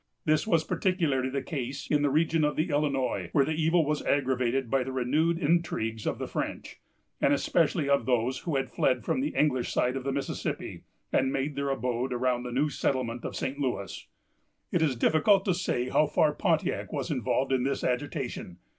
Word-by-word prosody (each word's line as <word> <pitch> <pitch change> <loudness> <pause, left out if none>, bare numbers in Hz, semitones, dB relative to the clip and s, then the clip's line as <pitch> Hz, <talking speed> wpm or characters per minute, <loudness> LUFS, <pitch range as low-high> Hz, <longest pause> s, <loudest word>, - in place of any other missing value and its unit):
This 155 +4 +2
was 165 -6 +3
particularly 165 -7 0
the 135 0 -3
case 135 -3 -4
in 150 -1 +2
the 145 - +2
region 160 +2 +2
of 150 - +1
the 160 +2 0
Illinois, 145 -3 0
where 140 -3 +4
the 155 - -2
evil 160 +1 +2
was 150 0 -1
aggravated 130 -2 +1
by 135 +2 +1
the 130 - -5
renewed 145 +7 +1
intrigues 145 - 0
of - - -1
the - - -4
French, - - -5 0.4
and - - +4
especially 160 +1 +1
of 140 -1 +2
those 125 0 +1
who 165 -5 -3
had 135 -2 -1
fled 125 -4 +1
from - - 0
the 295 - -2
English 130 -5 +1
side 125 +1 +1
of 135 - -3
the 135 - -1
Mississippi, 140 0 -4 0.3
and 130 0 +2
made 135 +2 -2
their 140 0 -1
abode 125 -1 -1
around 125 0 0
the 125 0 -6
new 135 +5 +1
settlement 125 -4 -2
of - - -5
St. 135 +2 -3
Louis. 125 -8 -3 0.6
It 175 - +1
is 150 -5 +2
difficult 190 - +3
to 190 - +2
say 130 -8 -1
how 155 - +3
far 150 +1 +2
Pontiac - - 0
was - - -3
involved 135 +1 0
in 130 -1 +2
this 135 +2 -1
agitation. 125 - -3
140 Hz, 195 wpm, -28 LUFS, 130-155 Hz, 0.6 s, where